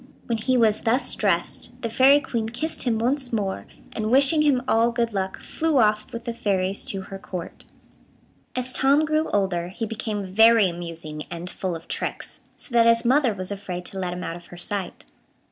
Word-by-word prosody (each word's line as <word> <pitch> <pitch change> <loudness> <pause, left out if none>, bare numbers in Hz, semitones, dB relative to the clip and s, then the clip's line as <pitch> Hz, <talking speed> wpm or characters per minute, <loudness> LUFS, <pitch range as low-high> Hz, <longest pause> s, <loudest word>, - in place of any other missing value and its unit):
When 230 -2 -1
he 255 +3 +1
was 220 -3 +3
thus 245 +3 +1
dressed, 205 +5 -1
the - - 0
Fairy 265 +5 +5
Queen 225 -5 -3
kissed 310 +8 -4
him 235 -3 +1
once 250 +3 -1
more, 200 -4 -2 0.3
and, 215 -1 -2
wishing 275 +5 +5
him 275 -5 +3
all 230 +1 +3
good 235 -1 -1
luck, 190 -1 -2
flew 320 -2 -1
off 215 -3 +2
with 230 0 -7
the 235 - -3
fairies 195 -3 0
to 195 - -3
her 195 0 -9
Court. 180 -3 -8 0.9
As 255 0 -2
Tom 280 +3 +4
grew 310 +1 0
older, 190 -4 0
he 210 +6 -4
became 215 -2 -4
very 225 +2 +5
amusing 165 -3 -6
and 175 +1 -4
full 185 -3 -3
of 165 - -10
tricks, - - -4
so 255 - -4
that 230 -1 +5
his 230 +1 +4
mother 260 0 +4
was 185 0 -1
afraid 185 -3 -5
to 195 - -5
let 180 -1 -2
him 180 0 -6
out 165 - -4
of 175 0 -12
her 175 - -12
sight. 195 +2 -4
220 Hz, 195 wpm, -24 LUFS, 190-245 Hz, 0.9 s, Fairy